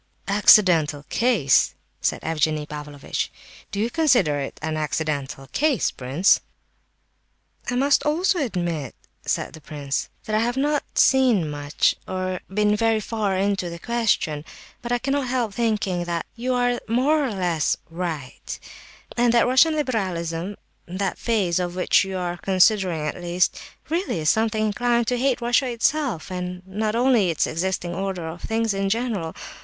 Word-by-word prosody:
"Accidental 180 -8 +5
case!" 220 - +3 0.3
said - - -1
Evgenie 155 -1 0
Pavlovitch. 150 -1 -5 0.4
"Do 200 - -4
you 225 +3 0
consider 240 - +3
it 135 - -5
an 155 0 -3
accidental 150 -3 -2
case, 300 -4 +1
prince?" 135 +9 +2 1.3
"I 245 - -1
must 275 +3 +3
also 350 +5 +1
admit," 175 - -2 0.3
said - - -1
the 160 - -11
prince, 140 -1 -4 0.2
"that 215 - -1
I - - +3
have 240 +3 0
not 290 +1 +1
seen 250 -11 +4
much, 145 0 +1
or 185 -1 -2
been 210 +1 +2
very 225 0 +2
far 210 -3 -1
into 195 -2 0
the 170 - -7
question; 200 -9 0 0.4
but 240 - -5
I 245 - +3
cannot 275 +1 -1
help 245 -4 -1
thinking 210 -6 0
that 170 -1 -2
you 250 +2 -1
are 245 0 +1
more 275 +7 +2
or 270 - 0
less 175 -5 0
right, 165 -6 -5 0.6
and 240 -1 +3
that 235 - +5
Russian 260 +6 +4
liberalism—that 190 - -3
phase 195 -7 +1
of 175 -1 -2
it - - -2
which - - +4
you 190 -1 -4
are 175 -1 -3
considering, 190 -2 +2
at 150 - -4
least—really 180 - -2
is 155 - +4
sometimes 220 -1 +1
inclined 235 +2 +1
to 250 -1 0
hate 260 -1 +1
Russia 240 +3 +2
itself, 245 - -1
and 180 0 -5
not 210 +3 -2
only 240 -6 +3
its 165 - +1
existing 175 +1 -2
order 190 -3 -3
of 165 +2 -7
things 225 -1 0
in 195 0 -1
general. 215 -7 -2
195 Hz, 150 wpm, -23 LUFS, 170-240 Hz, 1.3 s, Accidental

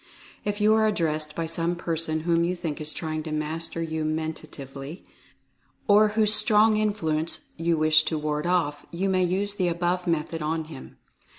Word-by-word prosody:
If 205 0 -2
you 210 +1 +5
are 220 0 +4
addressed 155 -6 -1
by 165 - -2
some 165 +1 -1
person 165 -2 -2
whom 170 0 +2
you 180 +2 0
think 165 -3 -4
is 155 0 -2
trying 155 -1 -3
to 155 0 -6
master 160 +2 -2
you 160 -1 -3
mentatively, 155 -1 -5 0.8
or 210 +1 +6
whose 215 -1 +5
strong 215 +1 +5
influence 165 -7 -1
you 165 0 0
wish 155 0 +5
to 160 - -1
ward 150 +1 -2
off, 155 -5 0
you 190 +3 -1
may 185 -1 +2
use 195 +3 0
the 185 -3 0
above 175 +1 -1
method 165 0 -1
on 160 +1 -1
him. 155 - -11
165 Hz, 175 wpm, -26 LUFS, 155-185 Hz, 0.8 s, or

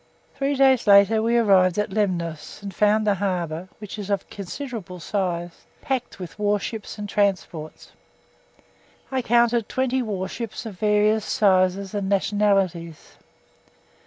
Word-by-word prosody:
Three 275 +1 -1
days 265 -4 +4
later 200 +2 +6
we 230 +2 +2
arrived 190 -5 +4
at 210 -1 -1
Lemnos, 175 -5 -3
and 200 -1 -6
found 210 +3 +2
the 205 - +3
harbour 180 -3 -3
(which 210 0 -8
is 205 -1 -6
of 200 -2 -1
considerable 200 -2 -7
size) 175 -2 -3
packed 260 -2 -3
with 185 +2 -9
warships 210 +1 -2
and 205 0 -5
transports. 190 -6 -2 1.2
I 260 -1 0
counted 235 -1 +2
20 260 0 0
warships 220 +2 -5
of 200 -5 -8
various 210 0 +2
sizes 190 -1 +2
and 200 -2 -2
nationalities. 195 -5 0
205 Hz, 130 wpm, -23 LUFS, 185-220 Hz, 1.2 s, later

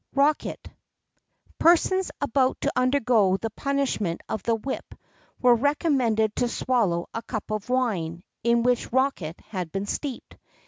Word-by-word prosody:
BOSC. - - -21
ROCKET. 290 +2 +1 0.9
Persons 355 +3 +4
about 265 -1 +1
to - - 0
undergo 250 -7 +3
the 225 +2 -4
punishment 260 -10 -1
of 220 - -3
the 230 +4 +1
whip 260 +5 -5 0.4
were 250 -1 +6
recommended 245 -5 +1
to 245 - +2
swallow 220 -9 0
a 230 - -3
cup 220 -2 -5
of 215 +2 -3
wine, 185 -10 -1 0.2
in 235 0 +3
which 245 0 +1
rocket 250 - 0
had 180 -6 -4
been 195 +1 -2
steeped. 265 +4 -5
235 Hz, 140 wpm, -25 LUFS, 210-270 Hz, 0.9 s, were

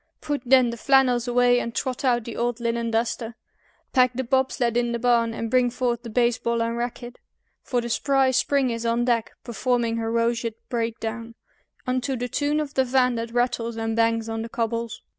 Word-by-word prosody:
Put 290 -3 -3
then 255 -2 +5
the 235 - -6
flannels 255 -1 +3
away 245 0 +4
and 235 -1 -5
trot 260 -1 -3
out 240 -3 +2
the 230 0 -7
old 240 0 -1
linen 235 0 -1
duster, 230 0 -2 0.6
Pack 255 -2 +4
the 260 - -1
bob 265 +2 +1
sled 235 -3 -1
in 240 0 +1
the - - 0
barn, 235 -1 +2
and 230 0 -4
bring 250 -1 +3
forth 240 -1 -1
the 235 - -8
baseball 235 0 +1
and 230 0 -2
racket, 240 0 -5 0.4
For 245 -2 -1
the 235 - -5
spry 270 +2 +2
Spring 260 0 +1
is 230 0 -4
on 235 +1 +1
deck, 235 -2 0
performing 240 -1 -1
her 225 0 -2
roseate 230 -1 0
breakdown 230 -1 -3 0.5
Unto 255 +1 -1
the 245 +1 -3
tune 290 +4 0
of 300 -1 -4
the 265 - +3
van 250 0 +2
that 230 0 -3
rattles 240 -1 -1
and 225 0 -2
bangs 230 0 +1
on 225 0 -3
the 230 - -6
cobbles. 230 -1 -3
240 Hz, 200 wpm, -24 LUFS, 230-250 Hz, 0.6 s, then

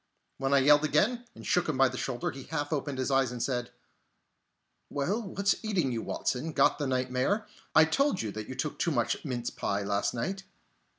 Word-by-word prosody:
When 135 0 0
I 140 - +6
yelled 145 +2 +6
again, 220 +12 +2
and - - -11
shook 175 -2 +2
him 150 - 0
by 135 0 +6
the 130 - -5
shoulder, 125 -1 -2
he 135 0 -9
half 145 -1 -2
opened 145 -2 -2
his 130 +1 -1
eyes 135 -2 +3
and 125 - -5
said: 125 -3 -1 1.2
"Well, 185 +11 -1
what's 200 0 -1
eating 185 -11 0
you, 115 -2 -2
Watson? 145 +8 -2
Got - - +3
the 145 - -1
nightmare? 130 - 0 0.3
I 160 - +8
told 245 - +1
you 110 - -2
that 105 +1 -7
you 130 - -5
took 150 - -3
too - - +1
much 120 -7 0
mince 120 -4 -3
pie 100 0 -2
last 100 +3 0
night!" 190 +12 -3
140 Hz, 200 wpm, -29 LUFS, 125-160 Hz, 1.2 s, I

